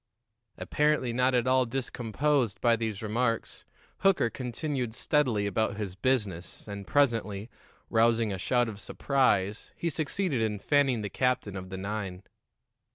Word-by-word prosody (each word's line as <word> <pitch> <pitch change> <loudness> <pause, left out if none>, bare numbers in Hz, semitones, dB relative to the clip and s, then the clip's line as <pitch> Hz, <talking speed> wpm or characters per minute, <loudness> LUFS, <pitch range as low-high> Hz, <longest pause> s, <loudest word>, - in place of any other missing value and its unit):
Apparently 150 -5 +1
not 125 +1 +2
at 120 -1 +2
all 130 -1 +3
discomposed 125 0 0
by 120 -1 +4
these 110 -2 -3
remarks, 115 +2 -1 0.3
Hooker 190 -12 +3
continued 125 -1 -3
steadily 125 -10 +1
about 100 0 0
his 100 -4 -4
business, 100 -8 -1
and 100 -2 -7
presently, 115 -6 +1 0.4
rousing 115 -2 +3
a 95 - -4
shout 120 +5 +2
of 105 -3 -6
surprise, 110 -6 0
he 170 - -2
succeeded 155 - -1
in 110 -2 0
fanning 135 -1 +2
the 105 - -3
captain 125 -6 0
of 95 -1 -6
the 95 - -5
nine. 95 -1 -4
115 Hz, 140 wpm, -29 LUFS, 105-130 Hz, 0.4 s, by